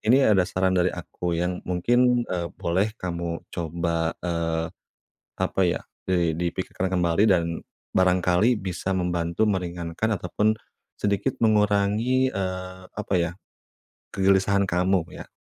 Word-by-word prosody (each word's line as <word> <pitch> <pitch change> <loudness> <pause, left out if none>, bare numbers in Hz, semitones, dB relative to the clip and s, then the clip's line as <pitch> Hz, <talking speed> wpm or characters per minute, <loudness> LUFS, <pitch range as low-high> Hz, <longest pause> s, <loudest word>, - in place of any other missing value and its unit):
Ini 125 +1 +4
ada 95 -3 +3
saran 95 0 +1
dari 90 0 +3
aku 90 -1 -4
yang 90 +1 -1
mungkin, 120 +7 +3
eee, 85 -2 -2
boleh 95 +6 0
kamu 85 -2 -3
coba, 85 -1 -1
eee, 85 -2 -1 0.8
apa - - 0
ya, - - +1 0.2
di 85 -3 +1
dipikirkan 90 +2 -2
kembali 90 +1 +2
dan 85 -3 +1 0.3
barangkali 90 +5 +3
bisa 95 0 -3
membantu 85 +2 0
meringankan 90 +1 -2
ataupun 105 +4 +1 0.5
sedikit 100 +6 0
mengurangi, 110 +4 +3
eee, 95 -3 -4
apa 105 -1 -4
ya, 85 -1 0 0.8
kegelisahan 100 +1 +3
kamu 90 +1 +2 0.2
ya. - - -18
90 Hz, 120 wpm, -25 LUFS, 85-100 Hz, 0.8 s, Ini